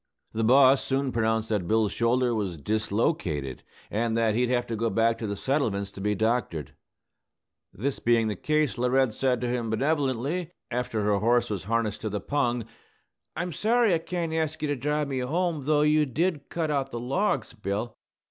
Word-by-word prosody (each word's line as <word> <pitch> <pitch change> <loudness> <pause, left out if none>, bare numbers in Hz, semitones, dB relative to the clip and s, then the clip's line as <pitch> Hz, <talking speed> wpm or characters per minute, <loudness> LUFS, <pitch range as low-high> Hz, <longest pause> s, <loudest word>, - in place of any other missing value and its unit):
The 115 - -1
boss 130 +3 +6
soon 135 0 0
pronounced 110 -1 0
that 105 -6 -1
Bill's 110 0 +2
shoulder 120 +1 +1
was 100 -6 -2
dislocated, 100 - -1 0.3
and 110 +1 0
that 115 -2 +2
he'd 120 +2 +1
have 125 -1 +1
to 115 - -3
go 115 +1 0
back 115 +2 +2
to 110 - -3
the 100 - -2
settlements 100 -5 -1
to 95 - -9
be 105 +1 0
doctored. 110 - -1 1.0
This 130 +7 -3
being 115 -1 +3
the 105 - -2
case, 150 +3 0
Laurette 125 -1 +2
said 125 +1 +1
to 125 - -1
him 120 -2 -1
benevolently, 145 +6 -1 0.2
after 120 -3 -1
her 100 -1 +2
horse 120 +2 +2
was 95 -3 -3
harnessed 115 -1 -1
to 110 - -2
the 105 0 -2
pung, 120 0 -1 0.7
"I'm 175 +1 -3
sorry 225 +4 +2
I 165 - +2
can't 170 -1 -3
ask 160 -1 -2
you - - +1
to 145 - +1
drive 150 +3 -1
me 135 -2 -2
home, 155 +2 -1
though 150 0 +3
you 150 0 +3
did 155 +2 -1
cut 160 -3 -1
out 140 -2 0
the 120 - -5
logs, 135 - -1
Bill. 105 +1 -3
120 Hz, 185 wpm, -27 LUFS, 110-145 Hz, 1.0 s, boss